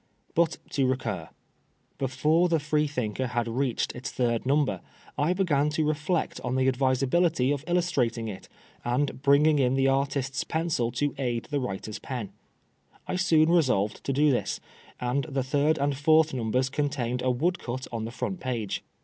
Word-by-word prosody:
But 165 -1 +2
to 135 -2 +2
recur. 105 -10 -2 0.7
Before 150 +6 +2
the 165 -1 +2
Freethinker 145 -6 -1
had 120 -1 -1
reached 125 +1 -1
its 125 - -5
third 120 -1 -1
number 135 -9 +1 0.3
I 155 +5 +2
began 150 -6 +2
to 155 - +2
reflect 155 +3 -1
on 125 - -2
the 130 0 +2
advisability 130 +3 +2
of 145 -1 -2
illustrating 135 -11 0
it, 100 -3 -8 0.3
and 130 +2 -1
bringing 145 +2 +4
in 130 -1 +2
the 135 0 +3
artist's 135 0 0
pencil 160 -8 -1
to 145 +3 0
aid 120 -3 -2
the 145 - +1
writer's 110 -3 -4
pen. 120 -7 -5 0.8
I - - -2
soon 165 -4 +4
resolved 125 - +2
to - - 0
do 145 +2 +3
this, 125 - -1 0.4
and 125 +3 -1
the 140 -4 -2
third 145 +4 +2
and 140 0 0
fourth 155 +2 +4
numbers 125 +1 0
contained 135 -4 -1
a 130 - +1
woodcut 130 -2 -1
on 115 -2 -3
the 115 - -5
front 180 +8 -4
page. 120 - -3
135 Hz, 160 wpm, -27 LUFS, 125-150 Hz, 0.8 s, bringing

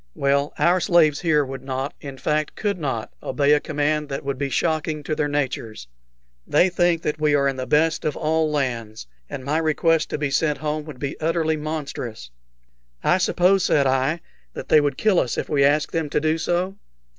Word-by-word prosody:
"Well, 140 +1 +1
our 175 +2 +3
slaves 165 -4 +3
here 150 -4 +2
would 135 0 -7
not 135 +2 -3
in 140 -2 -8
fact 150 +2 -1
could 200 -3 -2
not 130 -8 -3
obey 145 0 +1
a 150 - +4
command 150 0 -1
that 135 - -4
would 140 -1 -3
be 140 -1 -1
shocking 155 +1 -1
to 155 - -2
their 150 - 0
natures. 130 - -3 0.6
They 185 - +4
think 175 -2 +1
that 150 0 -2
we 150 -1 +3
are 140 -1 +2
in 135 - -1
the 130 -1 -5
best 150 +4 +2
of 155 - -2
all 160 0 +1
lands, 120 - -3 0.2
and 130 - -6
my 150 +3 +1
request 160 0 +1
to - - -2
be 145 -2 -2
sent 150 +1 +1
home 150 0 -3
would 155 -4 -9
be 140 +2 -5
utterly 160 0 +1
monstrous." 145 - -5 0.7
"I 185 - +3
suppose," 185 +1 +3
said 140 -2 +3
I, 135 +5 +1 0.3
"they 155 - +3
would 145 -2 -1
kill 210 -5 +3
us 120 - -1
if - - -3
we 140 -2 +2
asked 145 +2 +2
them 160 -3 -2
to 150 - +1
do 155 +2 0
so?" 180 +4 -1
150 Hz, 200 wpm, -23 LUFS, 140-160 Hz, 0.7 s, a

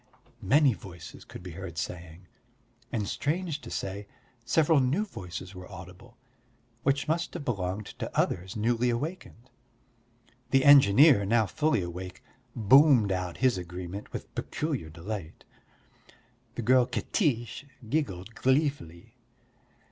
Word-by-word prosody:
many 135 +6 +4
voices 90 -4 -11
could - - -11
be 90 - -7
heard 85 -1 -8
saying; 85 +1 -6 0.7
and 105 -4 -2
strange 155 - -2
to - - -9
say, 100 +1 -5 0.4
several 155 +4 +3
new 140 +11 +1
voices 90 - -8
were 90 +1 -11
audible, 95 +6 -12 0.6
which 135 +3 +1
must 170 +3 -1
have 160 -5 -5
belonged 100 -2 -2
to - - -6
others 90 +2 -1
newly 120 +3 +1
awakened. 130 -2 -5 1.0
The 135 +1 +3
engineer, 140 -3 +7
now 110 +2 +3
fully 150 - 0
awake, 90 +1 -7 0.3
boomed 120 -1 +5
out 90 -2 -3
his 125 -7 +3
agreement 90 +3 -7
with - - -7
peculiar 145 - -3
delight. 85 +1 -7 1.1
The 120 - -4
girl 125 +1 +4
Katiche 125 - -1 0.2
giggled 110 - -2
gleefully. 130 - -1
115 Hz, 120 wpm, -28 LUFS, 90-140 Hz, 1.1 s, engineer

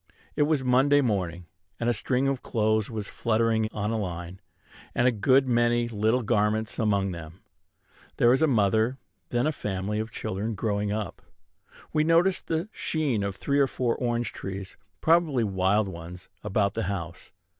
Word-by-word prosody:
It 145 - +3
was 150 -4 +1
Monday 135 +3 +4
morning; 90 -8 -1 0.3
and 120 - -1
a 120 - +3
string 130 +4 0
of 135 -2 -1
clothes 110 -1 0
was 110 -3 -4
fluttering 110 -1 +1
on 105 +1 -2
a 115 - -1
line, 90 -1 -5 0.5
and 120 - +3
a - - +5
good 130 +5 +3
many 120 -1 +2
little 110 +2 +1
garments 110 0 0
among 100 -3 +1
them. 85 +1 -9 0.8
There 120 +1 +5
is 130 - +2
a 160 - +5
mother, 110 0 +2 0.3
then, 120 - +1
and 150 - +2
a - - 0
family 105 -5 -3
of 110 +1 -3
children 110 +1 -3
growing 105 0 -1
up. 105 0 -4 0.7
We 155 -1 +3
noticed 170 +4 +2
the 165 +4 -1
sheen 145 - -1
of 100 -1 -2
three 140 +7 0
or 140 - +4
four 125 -2 -1
orange 120 -3 -1
trees, 95 0 -6 0.3
probably 160 -7 +3
wild 100 +1 +1
ones, 90 0 -9
about 100 -1 +1
the 115 - -2
house. 85 -4 -6
110 Hz, 170 wpm, -27 LUFS, 100-125 Hz, 0.8 s, a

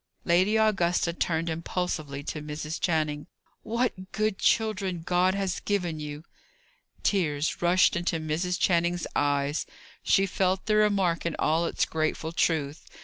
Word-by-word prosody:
Lady 185 +5 +3
Augusta 180 -6 +2
turned 165 -1 -1
impulsively 160 -3 -3
to 150 - -5
Mrs. 150 +1 -5
Channing. 155 -3 0 0.3
"What 225 -5 -2
good 215 -2 -1
children 195 -6 +1
God 180 +2 +2
has 195 -2 -1
given 180 -6 -2
you!" 150 0 -6 0.8
Tears 155 -6 0
rushed 180 +2 +4
into 170 -1 -1
Mrs. 165 +4 -2
Channing's 175 -1 +1
eyes; 145 +1 0 0.3
she 195 - +3
felt 190 0 0
the 215 -1 +2
remark 195 -5 +2
in 170 - -2
all 165 +2 +1
its - - 0
grateful 160 0 -2
truth. 155 -3 -1
170 Hz, 135 wpm, -27 LUFS, 155-190 Hz, 0.8 s, rushed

